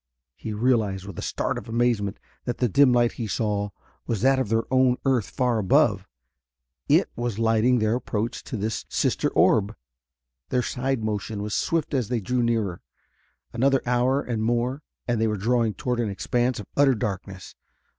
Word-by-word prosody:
He 110 Hz, -, -6 dB
realized 105 Hz, -4 st, +1 dB
with 100 Hz, -4 st, -8 dB
a -, -, -3 dB
start -, -, -2 dB
of -, -, -12 dB
amazement 115 Hz, -4 st, 0 dB, 0.3 s
that 120 Hz, -, -2 dB
the 125 Hz, -, +2 dB
dim 135 Hz, +4 st, +5 dB
light 120 Hz, -1 st, +3 dB
he 115 Hz, -, -5 dB
saw 105 Hz, -1 st, -1 dB, 0.4 s
was 110 Hz, -4 st, -1 dB
that 135 Hz, +1 st, +4 dB
of 130 Hz, -6 st, -1 dB
their 115 Hz, +1 st, +2 dB
own 130 Hz, -1 st, +4 dB
earth 130 Hz, -6 st, +1 dB
far 125 Hz, -3 st, 0 dB
above: 95 Hz, -3 st, +2 dB, 0.8 s
it -, -, +4 dB
was 120 Hz, -3 st, -3 dB
lighting 115 Hz, +2 st, +3 dB
their 110 Hz, -1 st, +1 dB
approach 115 Hz, -1 st, -3 dB
to 120 Hz, -, -5 dB
this 110 Hz, +2 st, -2 dB
sister -, -, 0 dB
orb. 105 Hz, 0 st, +3 dB, 0.7 s
Their 125 Hz, -1 st, +1 dB
side 130 Hz, -1 st, -2 dB
motion 105 Hz, -1 st, -3 dB
was 105 Hz, 0 st, -4 dB
swift 165 Hz, -2 st, 0 dB
as 130 Hz, -6 st, 0 dB
they 125 Hz, -1 st, -1 dB
drew 125 Hz, +4 st, -1 dB
nearer. 110 Hz, -7 st, 0 dB, 0.7 s
Another 135 Hz, +3 st, +2 dB
hour 125 Hz, +3 st, +2 dB
and 115 Hz, -3 st, -3 dB
more, 120 Hz, +5 st, 0 dB, 0.3 s
and 120 Hz, -2 st, 0 dB
they 110 Hz, -, +3 dB
were 105 Hz, -1 st, -1 dB
drawing 115 Hz, +1 st, +1 dB
toward 125 Hz, -1 st, -2 dB
an 115 Hz, -3 st, 0 dB
expanse 120 Hz, +5 st, -1 dB
of 105 Hz, -, -7 dB
utter 140 Hz, -2 st, +4 dB
darkness. 95 Hz, -2 st, -5 dB
115 Hz, 175 wpm, -25 LUFS, 105-125 Hz, 0.8 s, dim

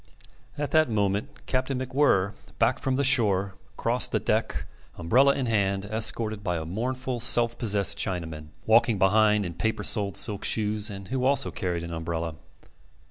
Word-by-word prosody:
At 145 Hz, 0 st, -3 dB
that 155 Hz, -3 st, +3 dB
moment 105 Hz, +6 st, -2 dB
Captain 130 Hz, 0 st, -1 dB
MacWhirr, 130 Hz, -7 st, +1 dB, 0.2 s
back 120 Hz, +3 st, +2 dB
from 130 Hz, -1 st, -1 dB
the 140 Hz, -, 0 dB
shore, 100 Hz, -8 st, +3 dB, 0.2 s
crossed -, -, 0 dB
the -, -, +1 dB
deck, -, -, -1 dB, 0.3 s
umbrella 125 Hz, +12 st, +3 dB
in 135 Hz, -, -2 dB
hand, 100 Hz, -3 st, 0 dB
escorted 110 Hz, 0 st, +1 dB
by 90 Hz, -3 st, -1 dB
a 80 Hz, -, -5 dB
mournful, 125 Hz, +7 st, -3 dB
self 120 Hz, 0 st, +3 dB
possessed 100 Hz, -5 st, +1 dB
Chinaman, 80 Hz, -5 st, -3 dB, 0.2 s
walking 115 Hz, 0 st, +4 dB
behind 105 Hz, +1 st, +3 dB
in 85 Hz, -, -5 dB
paper 105 Hz, +5 st, -2 dB
soled 100 Hz, -3 st, 0 dB
silk 100 Hz, 0 st, +1 dB
shoes, 105 Hz, 0 st, +1 dB
and 100 Hz, -2 st, -9 dB
who 130 Hz, -1 st, -2 dB
also 130 Hz, -8 st, +2 dB
carried 85 Hz, 0 st, -3 dB
an 85 Hz, 0 st, -6 dB
umbrella. 80 Hz, 0 st, -4 dB
105 Hz, 160 wpm, -26 LUFS, 95-125 Hz, 0.3 s, walking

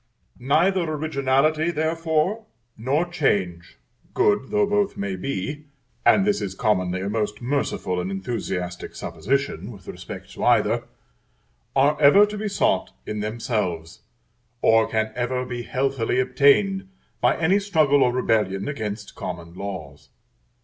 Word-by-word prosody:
Neither 170 Hz, +9 st, +2 dB
originality, 155 Hz, 0 st, +1 dB
therefore, 165 Hz, +5 st, 0 dB, 0.3 s
nor 135 Hz, +9 st, 0 dB
change, 100 Hz, -, -1 dB, 0.4 s
good 105 Hz, +5 st, +2 dB
though 210 Hz, -1 st, +2 dB
both 205 Hz, -1 st, 0 dB
may 100 Hz, -1 st, -2 dB
be, 140 Hz, +8 st, -4 dB, 0.4 s
and 195 Hz, -, +5 dB
this 205 Hz, 0 st, +1 dB
is 95 Hz, -1 st, -4 dB
commonly 95 Hz, -4 st, 0 dB
a 95 Hz, -, -3 dB
most 105 Hz, 0 st, -2 dB
merciful 120 Hz, -8 st, -1 dB
and 90 Hz, -, -4 dB
enthusiastic 95 Hz, -3 st, -4 dB
supposition 140 Hz, -1 st, -2 dB
with 100 Hz, -5 st, -14 dB
respect 90 Hz, 0 st, -8 dB
to -, -, -7 dB
either, -, -, +3 dB, 0.9 s
are 145 Hz, +3 st, +3 dB
ever 175 Hz, +9 st, +7 dB
to 210 Hz, 0 st, -6 dB
be 215 Hz, -, -2 dB
sought 200 Hz, -, 0 dB
in 105 Hz, -, -4 dB
themselves, 105 Hz, -, -3 dB, 0.6 s
or 110 Hz, 0 st, +5 dB
can 110 Hz, -1 st, 0 dB
ever 125 Hz, +1 st, -2 dB
be 125 Hz, -1 st, -5 dB
healthily 130 Hz, -1 st, -1 dB
obtained 140 Hz, +10 st, +3 dB, 0.3 s
by -, -, +3 dB
any 180 Hz, +5 st, +3 dB
struggle 155 Hz, -8 st, +3 dB
or 125 Hz, -, +4 dB
rebellion 105 Hz, -6 st, 0 dB
against 105 Hz, -7 st, -5 dB
common 85 Hz, -2 st, -7 dB
laws. 100 Hz, 0 st, -7 dB
125 Hz, 130 wpm, -23 LUFS, 100-155 Hz, 0.9 s, ever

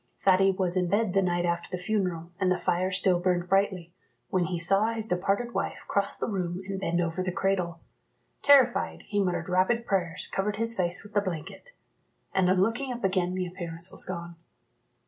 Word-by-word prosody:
Thady 195 Hz, 0 st, +5 dB
was 185 Hz, -2 st, 0 dB
in 180 Hz, -1 st, +1 dB
bed 205 Hz, 0 st, +1 dB
the 195 Hz, -, +4 dB
night 175 Hz, -1 st, 0 dB
after 170 Hz, 0 st, -1 dB
the 185 Hz, -, -3 dB
funeral, 180 Hz, -5 st, -1 dB
and 185 Hz, -2 st, +2 dB
the 185 Hz, -, +2 dB
fire 180 Hz, +2 st, 0 dB
still 185 Hz, -1 st, +3 dB
burned 175 Hz, -1 st, 0 dB
brightly, 190 Hz, -3 st, +1 dB, 0.4 s
when 185 Hz, -2 st, +1 dB
he 175 Hz, 0 st, -2 dB
saw 195 Hz, +5 st, +3 dB
his 225 Hz, -1 st, 0 dB
departed 200 Hz, +6 st, 0 dB
wife -, -, -3 dB
cross 200 Hz, 0 st, 0 dB
the -, -, -2 dB
room 185 Hz, -3 st, -3 dB
and 195 Hz, -1 st, -3 dB
bend 175 Hz, -2 st, 0 dB
over 170 Hz, +1 st, -1 dB
the 185 Hz, 0 st, -1 dB
cradle. 180 Hz, -3 st, -1 dB, 0.6 s
Terrified, 265 Hz, -4 st, +4 dB
he 205 Hz, -1 st, -1 dB
muttered 180 Hz, -1 st, -1 dB
rapid 190 Hz, +6 st, +2 dB
prayers, 180 Hz, -6 st, -1 dB
covered 205 Hz, +2 st, -2 dB
his 230 Hz, +2 st, -1 dB
face 180 Hz, -1 st, -1 dB
with 210 Hz, +1 st, -14 dB
the 205 Hz, -, +3 dB
blanket; 185 Hz, -, -6 dB, 0.6 s
and 185 Hz, -1 st, +3 dB
on 185 Hz, 0 st, +3 dB
looking 240 Hz, +5 st, -1 dB
up 240 Hz, -2 st, -6 dB
again 185 Hz, -1 st, +1 dB
the 185 Hz, -1 st, -1 dB
appearance 175 Hz, -1 st, -5 dB
was -, -, -3 dB
gone. 170 Hz, -2 st, -6 dB
185 Hz, 195 wpm, -28 LUFS, 175-200 Hz, 0.6 s, Thady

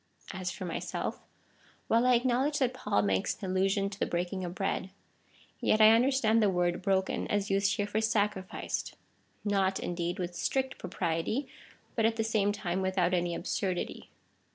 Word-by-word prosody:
As 185 Hz, -1 st, -3 dB
for 185 Hz, +1 st, -6 dB
myself 170 Hz, -, -3 dB, 0.3 s
— -, -, -31 dB
while 230 Hz, +2 st, +3 dB
I 250 Hz, -, +6 dB
acknowledge 260 Hz, +4 st, +1 dB
that 255 Hz, -2 st, +1 dB
Paul 250 Hz, -, 0 dB
makes 95 Hz, -2 st, +1 dB
an 190 Hz, -3 st, -4 dB
allusion 195 Hz, +1 st, +2 dB
to 200 Hz, 0 st, -8 dB
the -, -, 0 dB
breaking 180 Hz, +2 st, -2 dB
of 175 Hz, 0 st, -5 dB
bread, 195 Hz, -1 st, -2 dB, 0.7 s
yet 215 Hz, -, +2 dB
I 215 Hz, 0 st, +9 dB
understand 230 Hz, -1 st, +4 dB
the 210 Hz, -, +4 dB
word 175 Hz, -1 st, 0 dB
broken 190 Hz, 0 st, 0 dB
as 205 Hz, -1 st, 0 dB
used 195 Hz, 0 st, +2 dB
here 205 Hz, -, 0 dB
for 205 Hz, +1 st, -1 dB
sacrificed 205 Hz, -4 st, -1 dB, 0.3 s
— -, -, -37 dB
not, 195 Hz, -2 st, +1 dB
indeed, 175 Hz, +1 st, -2 dB
with 175 Hz, -2 st, -3 dB
strict 265 Hz, +8 st, -1 dB
propriety, 165 Hz, -, -2 dB, 0.5 s
but 225 Hz, -2 st, +3 dB
at 225 Hz, -, 0 dB
the 225 Hz, -, 0 dB
same 215 Hz, -2 st, +1 dB
time 190 Hz, -3 st, -2 dB
without 185 Hz, -1 st, +1 dB
any 175 Hz, -1 st, +1 dB
absurdity. 185 Hz, -3 st, -3 dB
195 Hz, 175 wpm, -30 LUFS, 180-220 Hz, 0.7 s, I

